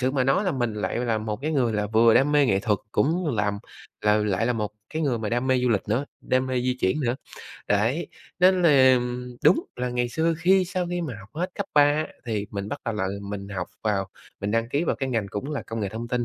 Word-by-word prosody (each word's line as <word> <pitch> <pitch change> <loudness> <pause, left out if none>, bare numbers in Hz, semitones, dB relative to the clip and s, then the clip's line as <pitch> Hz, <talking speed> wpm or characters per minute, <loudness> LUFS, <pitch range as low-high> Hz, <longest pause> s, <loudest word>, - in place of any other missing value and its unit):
sự 130 0 +1
mà 130 -2 +1
nói 135 +10 +2
là 185 - +1
mình 120 -5 -1
lại 105 - -2
là 120 -2 0
một 110 -1 -3
cái 155 +2 -1
người 125 -6 +2
là 105 -1 0
vừa 110 +2 +5
đam 145 +2 +4
mê 145 -2 +5
nghệ 95 -5 +2
thuật, 105 -3 +1
cũng 160 -1 +1
làm, 105 -1 0 0.4
ừ, 105 0 +3
lại 105 +2 0
là 125 - +2
một 105 -3 -2 0.2
cái 160 - -2
người 130 -6 +1
mà 110 -2 -3
đam 120 +2 0
mê 130 -1 +3
du 125 - +1
lịch 110 -5 +2
nữa, 115 +7 +1 0.2
đam 130 0 +1
mê 130 -1 0
di 125 0 0
chuyển 95 +11 +1
nữa. 125 -2 0 0.5
Đấy, 115 +11 +1 0.3
nên 185 0 +5
là 130 -6 +6 0.5
đúng - - +5
là 125 0 -2
ngày 120 0 0
xưa 165 +6 +1
khi 185 +3 +4
sau 180 -1 -2
khi 175 0 -1
mà 155 -8 -4
học 95 - -14
hết 175 +4 -2
cấp 200 - -3
3 145 - +7
á 150 +2 +2 0.2
thì 105 -3 -2
mình 100 0 -4
bắt 145 +4 -5
đầu 115 - -2
là 95 -3 -1 0.2
mình 100 0 -6
học 95 -3 -4 0.2
vào 100 -3 0 0.3
mình 100 - -2
đăng 115 +1 0
ký 145 +6 0
vào - - 0
cái 135 - -2
ngành 115 -5 -1
cũng 105 +10 -4
là 150 - -3
công 115 0 -5
nghệ 100 - -1
thông 115 +4 -6
tin. 125 -1 0
125 Hz, 260 wpm, -25 LUFS, 105-145 Hz, 0.5 s, 3